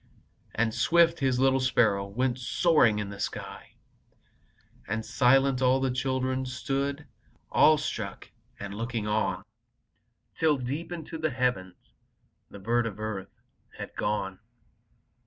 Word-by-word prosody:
And 110 Hz, 0 st, +1 dB
swift, 170 Hz, +7 st, +3 dB
His 130 Hz, -3 st, +1 dB
little 135 Hz, 0 st, +3 dB
sparrow 110 Hz, -6 st, +2 dB
Went 125 Hz, +5 st, -1 dB
soaring 125 Hz, -4 st, +3 dB
to 105 Hz, -, -2 dB
the 100 Hz, 0 st, -9 dB
sky, -, -, -6 dB, 1.1 s
And 110 Hz, +2 st, -2 dB
silent, 130 Hz, +3 st, +3 dB
all 130 Hz, +1 st, +4 dB
the 135 Hz, -1 st, 0 dB
children 130 Hz, 0 st, -1 dB
Stood, 140 Hz, +3 st, -2 dB, 0.5 s
awestruck, 155 Hz, -1 st, +2 dB, 0.3 s
looking 110 Hz, +2 st, -4 dB
on, 105 Hz, 0 st, 0 dB, 1.0 s
Till, 155 Hz, -3 st, +3 dB
deep 140 Hz, +7 st, -4 dB
into 165 Hz, -1 st, -6 dB
the 155 Hz, 0 st, 0 dB
heavens, 125 Hz, -9 st, -1 dB, 0.7 s
The -, -, -11 dB
bird 115 Hz, +4 st, 0 dB
of 105 Hz, -1 st, -7 dB
earth 105 Hz, -3 st, -6 dB, 0.3 s
had -, -, -8 dB
gone. 95 Hz, -3 st, -2 dB
125 Hz, 120 wpm, -28 LUFS, 110-135 Hz, 1.1 s, all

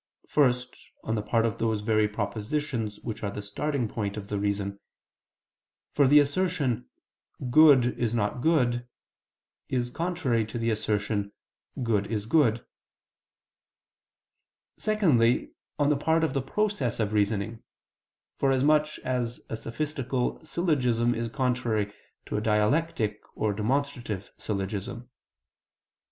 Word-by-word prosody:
First, 125 Hz, -3 st, +2 dB, 0.3 s
on 110 Hz, -, -2 dB
the 110 Hz, -, 0 dB
part 115 Hz, +2 st, +1 dB
of 115 Hz, -, -2 dB
those 110 Hz, -2 st, 0 dB
very 110 Hz, 0 st, +2 dB
propositions 110 Hz, +2 st, -3 dB
which 110 Hz, -3 st, -5 dB
are 100 Hz, -, -1 dB
the 105 Hz, +1 st, -6 dB
starting 125 Hz, +5 st, -2 dB
point 105 Hz, -1 st, -3 dB
of 100 Hz, -1 st, -7 dB
the 105 Hz, -, -1 dB
reason: 100 Hz, -1 st, -2 dB, 1.1 s
for 140 Hz, -2 st, +4 dB
the 145 Hz, +3 st, +7 dB
assertion 145 Hz, -5 st, +1 dB, 0.6 s
"Good 135 Hz, -4 st, +6 dB
is 120 Hz, -3 st, +1 dB
not 115 Hz, +2 st, -1 dB
good" 125 Hz, -6 st, +2 dB, 0.8 s
is 125 Hz, -1 st, -1 dB
contrary 165 Hz, -8 st, 0 dB
to 110 Hz, -, -5 dB
the 115 Hz, 0 st, 0 dB
assertion 105 Hz, -1 st, -1 dB, 0.5 s
"Good 105 Hz, -4 st, +1 dB
is 105 Hz, -2 st, -2 dB
good" 120 Hz, -3 st, +4 dB
(Peri -, -, -6 dB
Herm. -, -, -20 dB, 0.5 s
ii). -, -, -62 dB
Secondly, 160 Hz, -, +2 dB, 0.3 s
on 145 Hz, -1 st, +3 dB
the 145 Hz, -, +2 dB
part 160 Hz, +3 st, +2 dB
of 160 Hz, -, +1 dB
the 135 Hz, -, 0 dB
process 140 Hz, -, -1 dB
of 110 Hz, -1 st, 0 dB
reasoning; 105 Hz, +2 st, 0 dB, 0.8 s
forasmuch 150 Hz, +3 st, +3 dB
as 125 Hz, -2 st, -2 dB
a -, -, -1 dB
sophistical 130 Hz, +2 st, -3 dB
syllogism 125 Hz, -8 st, +1 dB
is 115 Hz, 0 st, -2 dB
contrary 120 Hz, -5 st, 0 dB, 0.3 s
to -, -, -3 dB
a -, -, 0 dB
dialectic 110 Hz, +1 st, +1 dB
or 110 Hz, -1 st, 0 dB
demonstrative 120 Hz, -2 st, -2 dB
syllogism. 105 Hz, +4 st, -4 dB
120 Hz, 130 wpm, -27 LUFS, 105-140 Hz, 1.1 s, the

